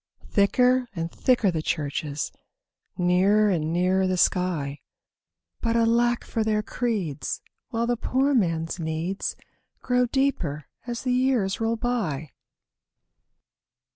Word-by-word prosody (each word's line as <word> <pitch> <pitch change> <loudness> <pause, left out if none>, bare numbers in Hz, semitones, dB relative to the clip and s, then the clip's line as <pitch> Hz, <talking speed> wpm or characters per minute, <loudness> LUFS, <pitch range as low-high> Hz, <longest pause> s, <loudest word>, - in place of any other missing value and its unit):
Thicker 250 +5 +3
and 165 0 -3
thicker 245 -7 +2
the 160 -2 -2
churches, 145 -1 -2 0.7
Nearer 195 +4 +4
and 160 -3 0
nearer 185 +2 +2
the 185 0 0
sky— 165 -6 +1 0.8
But 230 -1 0
alack 235 +1 +3
for 225 - -1
their 215 -1 +1
creeds 205 - -2 0.3
while 230 -1 -1
the 240 0 0
poor 265 +4 +1
man's 165 -7 0
needs 165 +4 -2 0.5
Grow 250 -1 +2
deeper 210 - 0 0.2
as 240 +1 -4
years 250 -6 +1
roll 225 +1 +1
by! 200 - -2
200 Hz, 110 wpm, -25 LUFS, 165-240 Hz, 0.8 s, Nearer